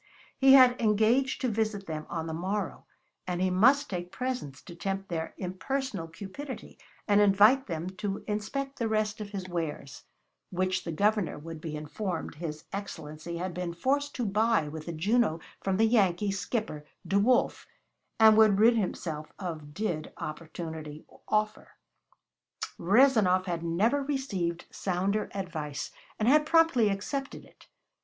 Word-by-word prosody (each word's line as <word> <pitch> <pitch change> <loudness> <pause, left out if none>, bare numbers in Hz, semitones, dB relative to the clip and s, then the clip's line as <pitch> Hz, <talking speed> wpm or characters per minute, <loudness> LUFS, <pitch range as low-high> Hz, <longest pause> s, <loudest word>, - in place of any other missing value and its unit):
He 270 0 +6
had 255 -2 +7
engaged 225 +5 +2
to 260 - +1
visit 215 -3 -1
them 155 -2 -5
on 165 -2 -3
the 160 - -4
morrow, 190 +4 -3 0.4
and 180 -1 -2
he 185 0 +1
must 260 +10 +5
take 175 -1 -5
presents 250 - -4
to 175 - -10
tempt 195 +2 -4
their 160 -2 -4
impersonal 190 +1 -3
cupidity, 200 - -8 0.3
and 205 -1 +5
invite 210 +7 +5
them 165 -2 -3
to 200 -1 -3
inspect 270 +7 -3
the 230 - 0
rest 215 -1 0
of 205 - -6
his 195 -3 -5
wares 160 -5 -5 0.4
which 185 0 -1
the 170 - -3
Governor 205 0 +1
would 160 +1 -8
be 155 -2 -5
informed 165 +4 -4
his 155 -1 -6
Excellency 170 -4 -6
had 180 +1 -3
been 175 -1 -4
forced 285 +8 0
to 245 - -1
buy 210 -4 +2
with 155 +1 -7
the - - -2
Juno 185 +1 +1 0.2
from 190 -1 0
the 225 - +4
Yankee 205 -3 +2
skipper, 195 -5 -3 0.2
D'Wolf, 205 +6 +2 0.5
and 220 -1 +8
would 215 -3 +6
rid 230 +2 +6
himself 160 -6 -3
of 160 -6 -6
did 170 -7 -2
opportunity 155 -1 -7 0.2
offer. 215 0 -1 1.1
Rezanov 200 -2 +4
had 170 -3 -2
never 200 +12 +1
received 205 - -2
sounder 195 +3 -1
advice, 160 -7 -4 0.3
and 215 - 0
had 300 +3 +5
promptly 325 -9 +4
accepted 275 +8 -4
it. - - -21
195 Hz, 150 wpm, -29 LUFS, 170-225 Hz, 1.1 s, and